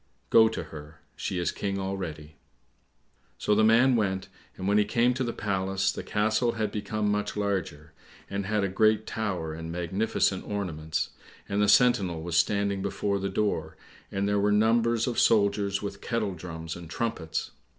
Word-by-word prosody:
"Go 110 0 +7
to 110 - -4
her; 75 0 -11
she 95 - -3
is 85 -1 0
King 100 -1 -3
already." 85 -6 -5 1.0
So 105 - +1
the 110 +1 +4
man 120 +4 +5
went, 95 -3 -1 0.3
and 95 - -4
when 100 +1 +4
he - - +5
came 120 +4 +2
to 130 +1 -2
the 120 - -1
palace, 95 -2 0
the - - -5
castle 110 +3 +1
had 110 -2 -2
become 105 0 -1
much 105 0 -2
larger, 95 -7 -2 0.3
and 100 -1 -3
had 105 -1 +1
a - - +2
great 110 +3 +2
tower 95 -9 -3
and 80 +1 -6
magnificent 95 +3 0
ornaments, 80 -6 -3 0.4
and 100 +1 0
the 105 - +3
sentinel 100 -8 +4
was 85 0 -3
standing 100 +2 +2
before 100 0 -1
the 100 0 -2
door, 80 -8 -1 0.3
and 100 +1 -1
there 105 0 +2
were 105 +1 +2
numbers 115 +2 +3
of 120 -2 -1
soldiers 100 -2 +2
with 100 -1 -5
kettle 110 -4 -1
drums 80 -1 -7
and 85 -2 -10
trumpets. 80 -6 -3
100 Hz, 170 wpm, -27 LUFS, 90-105 Hz, 1.0 s, Go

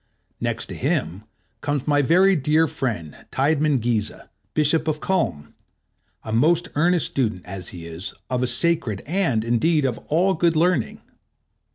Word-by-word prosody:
Next - - -2
to - - -8
him 95 +5 -2 0.4
comes 145 -2 -2
my 145 -1 +3
very 185 +7 +4
dear 155 +2 +3
friend, 110 - -4 0.2
Tidemann 145 0 +2
Giese, 115 -2 -1 0.3
Bishop 155 +2 +2
of 155 -1 0
Culm, 115 - -1 0.7
a 110 - -6
most 165 +9 +3
earnest 170 +2 +2
student, 110 -9 -2
as 95 0 -7
he 85 -2 -8
is, 85 +4 -7
of 125 -1 -1
sacred 120 - 0
and, 160 - +1
indeed, 140 +6 +2
of 125 -3 -1
all 180 +5 +3
good 170 0 +2
learning. 160 -6 +1
145 Hz, 145 wpm, -23 LUFS, 115-165 Hz, 0.7 s, very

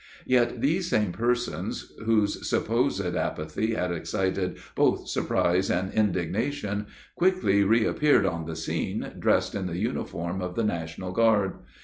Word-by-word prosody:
Yet 120 -2 +2
these 170 +5 +1
same 105 - +2
persons, 120 +5 -2
whose 110 -2 +1
supposed - - +1
apathy 80 +9 -1
had 90 -3 -1
excited 95 +1 -1 0.2
both - - +2
surprise 90 +2 +1
and 95 +2 0
indignation, 105 - -1 0.3
quickly 175 - +3
reappeared 115 +4 +3
on 85 -3 -1
the 80 - -4
scene, 80 0 -3
dressed - - +2
in 95 -2 -2
the 85 -1 -4
uniform 95 -4 -3
of 90 -1 -4
the 115 - 0
National 85 -2 -3
Guard. 105 -2 +2
100 Hz, 130 wpm, -27 LUFS, 90-115 Hz, 0.3 s, quickly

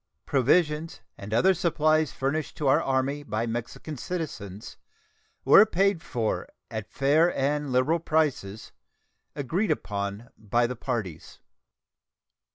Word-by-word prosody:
Provisions 150 +4 +1
and 100 +1 -9
other 185 +13 +4
supplies 155 -3 +1
furnished 140 +3 -3
to 150 - -1
our 135 - +4
Army 135 +2 0
by 110 -4 -2
Mexican 120 +6 -5
citizens 115 - -6 0.7
were 200 - +9
paid 195 -3 +1
for 115 -9 -2 0.2
at 110 -2 -5
fair 155 +5 +3
and 145 +1 0
liberal 130 +7 +2
prices, 145 -11 -1 0.6
agreed 170 - -1
upon 100 +2 -3
by 120 +3 +1
the 125 +2 -3
parties. 115 - -5
135 Hz, 115 wpm, -26 LUFS, 115-160 Hz, 0.7 s, were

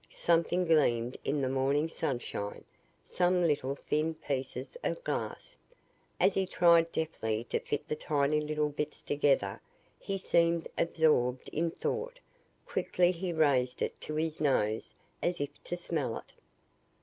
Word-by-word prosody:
Something 170 +2 +2
gleamed 125 -7 +3
in 145 +1 0
the 130 - +1
morning 135 +4 +1
sunshine 120 -9 -4 0.4
some 180 0 +2
little 140 -3 +1
thin 155 +3 -1
pieces 140 - -4
of - - -2
glass. - - -4 0.6
As 190 +2 +4
he 190 0 0
tried 170 -2 +5
deftly 110 -9 -2
to - - +2
fit 145 - -3
the - - -1
tiny 150 0 +1
little 150 0 0
bits 150 +1 -4
together, 135 -9 +1 0.4
he 195 - -3
seemed 170 -2 +2
absorbed 150 -7 +2
in 165 +2 0
thought. 475 - -3 0.5
Quickly 175 0 +2
he 180 0 -3
raised 140 -6 +2
it - - -4
to 155 - -5
his 160 0 -2
nose, 110 -7 +1 0.3
as 175 0 0
if 145 0 -5
to 175 - -2
smell 155 -9 -2
it. - - -12
155 Hz, 140 wpm, -31 LUFS, 135-170 Hz, 0.6 s, tried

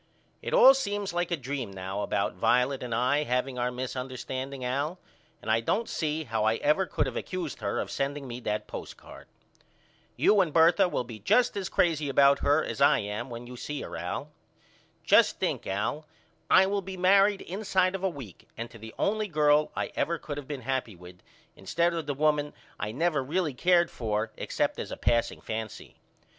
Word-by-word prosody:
It - - -5
all 265 - +8
seems 205 -7 -2
like 175 0 -1
a 170 - 0
dream 135 -3 -4
now 95 +1 -5
about - - -1
Violet 125 +2 +2
and 120 -2 -3
I 130 +5 +2
haveing 125 -1 -1
our 120 0 +1
misunderstanding 130 +1 -5
Al 140 +7 -1 0.5
and 110 - -1
I 110 - +4
don't 215 - -1
see 155 -1 -2
how 110 -5 -2
I 110 +1 +3
ever 155 +9 +1
could - - 0
of - - -5
accused 175 -9 -4
her 100 -2 -2
of - - -4
sending 140 0 -3
me 120 0 -6
that 105 -3 -2
postcard. - - -10 0.9
You 205 -1 +4
and 175 -4 0
Bertha 165 +3 +5
will 125 - -1
be 115 -3 -10
just 245 - +3
as 195 -2 -3
crazy 155 -4 +1
about 140 +1 +5
her 145 +2 +3
as - - -5
I 140 - +6
am 105 +4 -4
when 120 0 -7
you 125 +1 -9
see 145 +4 -5
her - - -7
Al. - - -4 0.7
Just - - +4
think - - -2
Al 105 +11 -2 0.4
I 190 - +7
will 200 +1 -1
be 190 0 -7
married 195 +2 +4
inside 190 -1 0
of 195 -1 -5
a 190 - +2
week 130 - -11
and 115 +1 -6
to 115 - -13
the 110 +1 -10
only 215 +1 0
girl 150 -3 +3
I - - -2
ever 170 +1 0
could 145 -2 -6
of 140 - -10
been 145 -3 -5
happy 125 -4 -2
with 90 +1 -14 0.4
instead 170 - 0
of 165 -3 -4
the 145 - -2
woman 150 0 +1 0.3
I 105 - -3
never 150 +2 0
really 155 +2 -1
cared 175 +5 +3
for 110 -1 -2
except - - -2
as - - -5
a - - -5
passing 115 -1 0
fancy. 110 -1 -6
140 Hz, 195 wpm, -28 LUFS, 120-170 Hz, 0.9 s, all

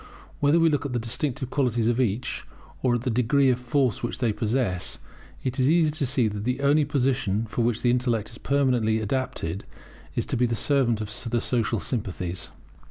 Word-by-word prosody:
Whether 145 +3 +4
we 165 -1 +4
look 145 -1 0
at 140 -3 -4
the - - +1
distinctive 130 +3 -2
qualities 120 -5 +1
of 120 +2 +2
each, 120 +1 -1 0.4
or 125 -2 +2
at 120 - -2
the 125 - 0
degree 125 +3 +3
of 125 - -1
force 125 0 0
which 120 - -3
they 120 -4 +1
possess, 110 -5 -1 0.5
it 130 +1 -2
is 130 +2 +4
easy 160 -1 +4
to 150 -3 -1
see 125 -3 +2
that 105 -1 -4
the 125 +3 -1
only 145 +2 +4
position 130 -7 0
for 115 +2 -3
which 115 -1 0
the 120 - +4
intellect 120 -3 0
is 115 - -7
permanently 125 -6 +2
adapted 105 -6 -2 0.5
is - - 0
to - - -2
be 125 +1 +3
the 115 - -1
servant 120 -4 +1
of 110 +3 -4
the 120 +1 +1
social 115 -2 0
sympathies. 90 -7 -4
125 Hz, 200 wpm, -25 LUFS, 110-135 Hz, 0.5 s, Whether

